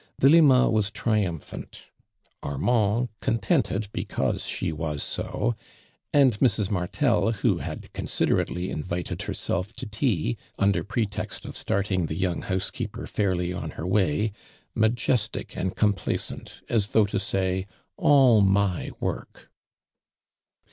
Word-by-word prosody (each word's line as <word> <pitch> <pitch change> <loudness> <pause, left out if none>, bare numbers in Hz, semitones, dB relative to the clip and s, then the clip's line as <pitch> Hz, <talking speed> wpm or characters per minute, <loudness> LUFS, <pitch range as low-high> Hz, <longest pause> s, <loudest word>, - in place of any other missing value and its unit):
Delima 140 -3 +6
was 110 -2 +2
triumphant, 105 -7 -2 0.6
Armand 110 - +1
contented 105 -1 0
because - - -1
slio 80 - -2
wim 75 -2 -3
so, - - -2 0.6
und 130 -7 +4
Mrs. 105 -5 +2
Martel, 105 +6 +1
wlio 105 -3 +1
had - - -7
considtn - - +1
ately 90 +2 -4
invited 85 +3 -4
herself 90 +6 -3
to - - -6
tea, 105 - 0 0.2
under 100 -4 +2
pretext 105 0 -3
of - - -7
starting 95 -4 0
the 80 - -4
young 90 -2 -1
house 95 -1 -2
kooper - - -5
fairly 90 -3 0
on 90 - -4
hor 80 - -4
way, 95 +1 +1 0.4
ma 110 0 +4
jestic 115 -1 -1
and 95 0 -2
complacent 105 -4 -1
as 110 -4 +1
thoii;,'li 110 0 +4
to 100 - 0
say 95 -1 -1 0.3
'<ttU 130 -7 +6
my 95 -2 +2
work!"' - - -5
100 Hz, 125 wpm, -26 LUFS, 90-110 Hz, 0.6 s, Delima